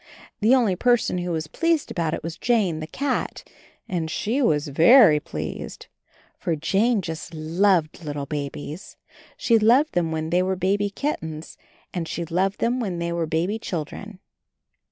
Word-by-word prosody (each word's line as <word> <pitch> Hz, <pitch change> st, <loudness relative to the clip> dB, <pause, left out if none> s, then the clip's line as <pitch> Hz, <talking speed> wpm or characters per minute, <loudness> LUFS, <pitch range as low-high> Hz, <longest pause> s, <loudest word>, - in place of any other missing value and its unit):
The 225 Hz, +5 st, +5 dB
only 225 Hz, -8 st, +2 dB
person 240 Hz, -3 st, +2 dB
who 175 Hz, 0 st, -3 dB
was 160 Hz, -2 st, -2 dB
pleased 330 Hz, -, 0 dB
about 165 Hz, -3 st, -1 dB
it -, -, -8 dB
was 165 Hz, 0 st, -5 dB
Jane, 200 Hz, -8 st, +1 dB
the 155 Hz, -, -6 dB
cat, 270 Hz, -, -3 dB, 0.4 s
and 170 Hz, -4 st, -2 dB
she 230 Hz, -, -1 dB
was 150 Hz, -, +2 dB
very 165 Hz, -, +7 dB
pleased. -, -, -6 dB, 0.5 s
For 165 Hz, -, -1 dB
Jane 195 Hz, +7 st, +1 dB
just 160 Hz, 0 st, -6 dB
loved 165 Hz, +1 st, +1 dB
little 145 Hz, -2 st, -4 dB
babies. 145 Hz, +3 st, -6 dB, 0.4 s
She 230 Hz, -2 st, +3 dB
loved 245 Hz, +8 st, +4 dB
them 170 Hz, -3 st, 0 dB
when 160 Hz, 0 st, -3 dB
they 180 Hz, +1 st, +3 dB
were 190 Hz, +1 st, 0 dB
baby 200 Hz, +3 st, 0 dB
kittens 160 Hz, -, -4 dB, 0.4 s
and 170 Hz, -3 st, -3 dB
she 170 Hz, -, -3 dB
loved 185 Hz, +4 st, 0 dB
them 245 Hz, +2 st, +1 dB
when 195 Hz, -7 st, -2 dB
they 170 Hz, 0 st, -2 dB
were 170 Hz, -1 st, -1 dB
baby 175 Hz, +7 st, -1 dB
children. 195 Hz, +3 st, -6 dB
175 Hz, 160 wpm, -24 LUFS, 160-215 Hz, 0.5 s, very